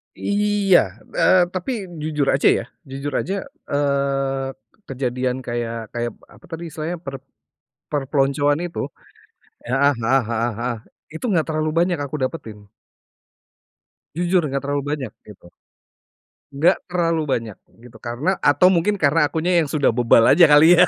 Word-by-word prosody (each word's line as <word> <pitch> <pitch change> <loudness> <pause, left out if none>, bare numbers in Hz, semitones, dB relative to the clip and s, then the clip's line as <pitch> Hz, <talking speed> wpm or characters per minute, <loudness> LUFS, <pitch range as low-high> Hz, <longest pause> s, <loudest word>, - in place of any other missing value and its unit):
Iya, 205 -2 +2 0.4
eee, 185 -1 +5
tapi 185 +7 -3 0.3
jujur 150 -2 -1
aja 135 - +3
ya, - - -3 0.3
jujur 140 +2 -5
aja, 195 - -3 0.4
eee, 140 -1 0 0.4
kejadian 125 -1 -2
kayak 115 -2 -4
kayak 120 0 -2 0.2
apa - - -18
tadi 165 +1 -6
istilahnya, 160 +4 -4
per 135 0 -5 0.8
perpeloncoan 145 +1 +1
itu, 175 -1 -5 0.8
heeh 135 +4 +2
heeh 130 +4 +3
heeh 115 +1 0
heeh, 120 0 -2 0.4
itu 160 - -6
enggak 170 -6 +2
terlalu 155 -1 -1
banyak 175 -1 +1
aku 145 +1 -4
dapetin. 130 -5 -4 1.6
Jujur 175 +1 +2
enggak 140 0 -2
terlalu 140 0 -1
banyak, 135 -7 -3 0.2
gitu. 100 -4 -14 1.1
Enggak 165 +7 +3
terlalu 170 -3 0
banyak 115 -6 -2 0.3
gitu, 120 -2 -14
karena 125 - -2
atau 145 +6 +4
mungkin 190 +4 +2
karena 155 -3 +3
akunya 170 +3 +1
yang 160 - 0
sudah 145 0 +2
bebal 115 -1 +4
aja, 170 +2 +7
kali, 160 +4 +7
ya. 180 - +7
145 Hz, 140 wpm, -21 LUFS, 130-170 Hz, 1.6 s, aja